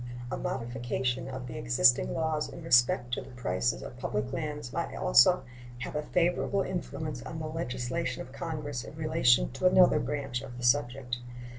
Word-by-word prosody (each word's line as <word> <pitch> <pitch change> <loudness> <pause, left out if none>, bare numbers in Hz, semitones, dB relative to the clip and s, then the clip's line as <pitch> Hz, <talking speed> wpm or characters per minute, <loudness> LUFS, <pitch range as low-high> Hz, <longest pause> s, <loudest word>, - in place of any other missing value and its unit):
A - - -1
modification 125 +1 -2
of 130 -1 -6
the 120 -1 -6
existing 120 +2 +3
laws 160 -2 -1
in 135 - -9
respect 120 0 +3
to - - 0
the - - -12
prices 120 -2 -1
of - - -8
the 125 - -14
public 105 +5 -2
lands 150 -3 -4
might - - -3
also - - +5 0.4
have 130 - -5
a 150 - 0
favorable 180 +4 +1
influence 155 -7 -4
on 160 - -7
the 155 - -4
legislation 125 -5 -3
of 130 - -14
Congress 150 -5 -4
in 150 - -10
relation 155 -7 +3
to 130 +8 +1
another 180 -4 +6
branch 135 -2 -3
of 125 -3 -9
the 125 - -7
subject. 125 -1 +1
130 Hz, 175 wpm, -29 LUFS, 120-150 Hz, 0.4 s, another